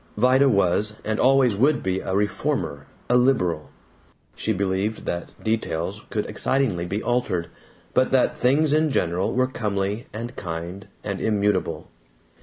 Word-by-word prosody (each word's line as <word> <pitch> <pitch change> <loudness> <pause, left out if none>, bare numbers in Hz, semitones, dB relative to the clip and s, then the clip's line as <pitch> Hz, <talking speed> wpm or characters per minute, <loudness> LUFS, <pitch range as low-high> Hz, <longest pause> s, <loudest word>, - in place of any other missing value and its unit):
Vida 130 +4 +5
was, 105 0 +2
and 110 0 -1
always 130 -4 +4
would 140 +8 +2
be, 95 0 0
a 95 - -3
reformer, 90 -8 -1 0.2
a 120 - +3
liberal. 110 - +2 0.7
She 110 - -1
believed 100 +2 -1
that 85 0 -3
details 105 -3 -2
could 105 - -2
excitingly 105 -5 0
be 100 +4 -3
altered, 120 -9 0 0.4
but 130 - +3
that 130 -2 +3
things 145 +4 +3
in 155 0 +3
general 90 - 0
were 130 +1 +2
comely 105 -3 -2
and 115 +3 -6
kind 85 +2 -6 0.2
and - - -3
immutable. 100 -7 0
105 Hz, 140 wpm, -24 LUFS, 95-125 Hz, 0.7 s, Vida